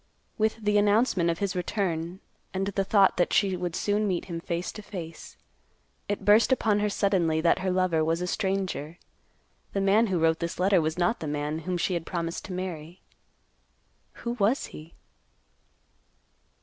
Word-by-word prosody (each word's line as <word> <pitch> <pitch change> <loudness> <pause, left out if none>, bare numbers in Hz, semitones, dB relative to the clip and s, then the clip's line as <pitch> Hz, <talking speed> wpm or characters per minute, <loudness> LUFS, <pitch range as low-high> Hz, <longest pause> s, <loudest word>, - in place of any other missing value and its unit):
With 220 0 +2
the 210 0 +3
announcement 205 -4 +3
of 165 - 0
his 200 0 -2
return, 180 -2 -2 0.3
and 190 +1 0
the 195 0 -1
thought 195 -1 +4
that 175 - +2
she 195 -2 +3
would 175 -1 -3
soon 210 +1 0
meet 180 -3 -1
him 170 -3 -5
face 170 +1 -3
to 215 - -9
face, 170 -5 -9 0.7
it 205 - -2
burst 215 +5 +5
upon 220 -5 +2
her 210 0 +1
suddenly 185 -6 +1
that 170 +1 +3
her 190 - -1
lover 180 -3 +2
was 165 +1 0
a 180 - -2
stranger. 185 -4 -2 0.8
The 195 - 0
man 205 +4 +4
who 190 -3 0
wrote 160 0 +2
this 170 0 -4
letter 190 -1 +4
was 155 +1 -2
not 175 +6 +1
the 160 - -5
man 150 +1 -2
whom 180 - 0
she 180 - 0
had 170 -2 -3
promised 170 -1 -3
to 190 - -6
marry. 175 -2 -6 1.3
Who 235 - 0
was 220 +7 +2
he? 155 +2 -11
185 Hz, 175 wpm, -27 LUFS, 170-200 Hz, 1.3 s, burst